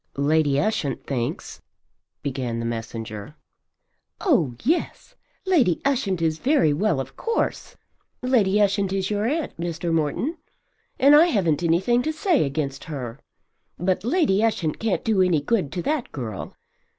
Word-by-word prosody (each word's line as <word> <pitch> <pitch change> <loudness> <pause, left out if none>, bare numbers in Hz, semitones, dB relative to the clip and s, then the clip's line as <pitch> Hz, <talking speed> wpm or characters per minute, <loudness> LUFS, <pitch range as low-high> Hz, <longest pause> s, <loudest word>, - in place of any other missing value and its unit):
"Lady 145 0 +2
Ushant 150 - -1
thinks 120 -4 -4 0.3
" - - -54
began 130 -4 -3
the 115 - -3
messenger. 115 +2 -5 0.8
"Oh 170 - +2
yes, 340 - -1 0.3
Lady 285 - +3
Ushant 215 -11 0
is 160 -1 0
very 265 - +3
well 170 -1 +1
of 135 0 -6
course. 460 0 -2 0.5
Lady 215 -6 +3
Ushant 200 -1 +2
is 195 +1 -1
your 210 +1 0
aunt, 305 +3 -2
Mr. 170 0 -2
Morton, 165 - -1 0.6
and 280 +2 +6
I 320 +4 +7
haven't 175 - +1
anything 180 +9 +2
to 315 - -1
say 315 - +2
against 140 -1 -3
her. 130 -5 -6 0.6
But 180 +2 0
Lady 240 - +2
Ushant 180 -9 0
can't 220 -4 -1
do 215 -4 +3
any 180 -4 +3
good 165 -1 0
to 175 -2 -3
that 295 -4 -1
girl. 110 -8 -6
180 Hz, 145 wpm, -24 LUFS, 140-240 Hz, 0.8 s, I